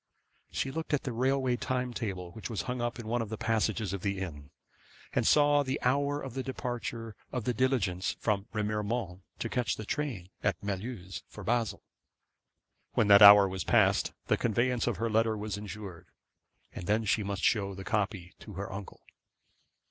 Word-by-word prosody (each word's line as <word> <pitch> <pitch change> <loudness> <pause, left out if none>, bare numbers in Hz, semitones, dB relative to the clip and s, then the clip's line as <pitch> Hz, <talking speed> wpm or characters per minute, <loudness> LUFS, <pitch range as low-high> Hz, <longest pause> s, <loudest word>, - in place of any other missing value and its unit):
She 135 - -2
looked 160 +1 -1
at 140 - -4
the 130 - -3
railway 130 +1 +1
time 125 -1 -2
table 95 -7 -4
which 110 +6 -7
was 115 - -2
hung 125 -1 -3
up 120 0 -2
in 120 - -7
one 120 +1 0
of 110 - -4
the 110 - -4
passages 110 -3 0
of 100 - -4
the 100 0 -1
inn, 75 -7 -6 0.6
and - - +2
saw 145 -1 +5
the 135 0 -2
hour 140 +3 +2
of 135 -4 -7
the 135 - -2
departure 120 -4 -4 0.2
of 125 -3 -2
the 125 - 0
diligence 110 -7 0
from 100 -2 0
Remiremont 105 -2 -2 0.2
to - - -3
catch 115 -3 0
the 110 - -7
train 115 - -3
at 100 - +1
Mulhouse 95 -3 -5
for 105 - -10
Basle. 115 +1 0 1.1
When 105 - +2
that 100 0 +9
hour 100 -1 +11
was 95 -2 -3
passed, - - +3
the - - +2
conveyance 120 +2 +1
of - - 0
her 115 - 0
letter 110 0 +2
was 105 -1 -3
insured, 105 -4 -8 0.7
and 85 - -7
then 110 +2 +2
she 105 +2 +2
must 100 -1 -3
show 100 -3 +2
the 95 - -7
copy 100 -3 -2
to 105 - -10
her 95 0 -5
uncle. 100 0 -8
110 Hz, 185 wpm, -30 LUFS, 100-125 Hz, 1.1 s, hour